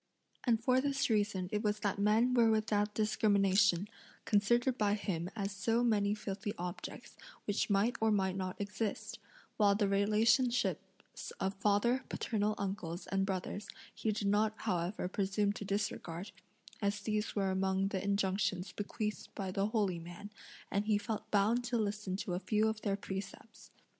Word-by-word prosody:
And 235 -3 +3
for 255 +2 +3
this 275 -2 0
reason 205 -4 +1
it 210 - 0
was 210 -1 0
that 200 -1 -1
men 220 +5 +3
were 235 -2 +5
without 210 -1 +1
discrimination, 200 -3 +3 0.4
considered 240 +5 +3
by 205 -3 +2
him 180 -4 -3
as 200 -2 -2
so 225 +4 +1
many 210 -3 +2
filthy 205 0 -4
objects, 175 0 -6 0.3
which 205 +1 0
might 210 +5 +2
or 220 - +4
might 190 -3 +1
not 185 -1 -4
exist; 205 +1 -3 0.4
while 205 -2 +5
the 205 -1 +2
relationships 215 +5 +1
of 190 0 0
father, 210 +6 +2
paternal 210 -2 0
uncles, 190 -3 -4
and 195 0 +1
brothers, 190 +2 -3 0.3
he 220 - -1
did 210 -1 -2
not 210 +2 +3
however 180 -2 -1
presume 200 +2 0
to 205 - -6
disregard, 195 -2 -3 0.5
as 200 0 0
these 215 +1 -1
were 195 -2 +1
among 190 +1 +1
the 190 -2 -2
injunctions 195 -1 0
bequeathed 210 +1 -4
by 190 -2 -3
the 195 +2 0
holy 205 -6 0
man, 175 +5 -9 0.4
and 200 +1 0
he 215 -2 +4
felt 215 +1 -4
bound 215 +4 +3
to 240 0 0
listen 210 -3 -2
to 190 -2 -3
a 175 - -1
few 210 +3 +1
of 220 0 -2
their 200 -2 0
precepts. 195 +3 -7
205 Hz, 160 wpm, -34 LUFS, 195-215 Hz, 0.5 s, were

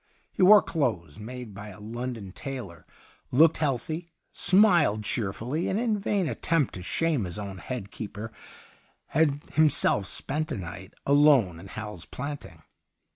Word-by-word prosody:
He - - -4
wore 205 +2 +8
clothes 95 - -2
made 120 0 -8
by 100 +2 -9
a 105 0 -11
London 115 -2 -5
tailor, 115 - -7 0.4
looked 155 +6 +5
healthy, 155 +4 -2 0.2
smiled 175 - +4
cheerfully, 115 - -2
and, 195 - 0
in 225 -3 +1
a - - -6
vain 195 -3 0
attempt 165 -3 0
to 90 - -7
shame 150 - 0
his 90 +2 -6
own 100 -3 -6
head 100 +3 -6
keeper, 110 +1 -7 0.8
had 145 -2 +1
himself 145 -9 +4
spent 155 +8 -2
a 135 - -2
night 90 0 -8
alone 140 - +4
in 95 - -11
Hal's 105 -4 -7
Planting. 140 - -7
125 Hz, 145 wpm, -27 LUFS, 100-155 Hz, 0.8 s, wore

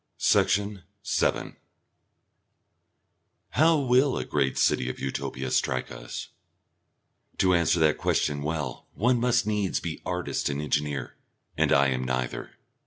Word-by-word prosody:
Section 100 0 +2 0.2
7 - - 0 1.9
How 160 +1 +4
will 130 0 +3
a - - -3
great 65 -1 0
city 65 - +2
of - - -6
Utopia 65 -1 -4
strike 65 0 0
us? - - -7 1.1
To 95 -1 +3
answer 85 0 +3
that 75 -1 +3
question 75 -1 0
well 75 0 -4
one 120 +3 +2
must 120 -1 +2
needs 105 -3 0
be 80 -2 -5
artist 90 -4 -2
and 70 0 -2
engineer, 75 -2 -2 0.4
and - - +1
I 70 0 +5
am 65 -1 -1
neither. 65 -1 -3
80 Hz, 125 wpm, -27 LUFS, 65-105 Hz, 1.9 s, I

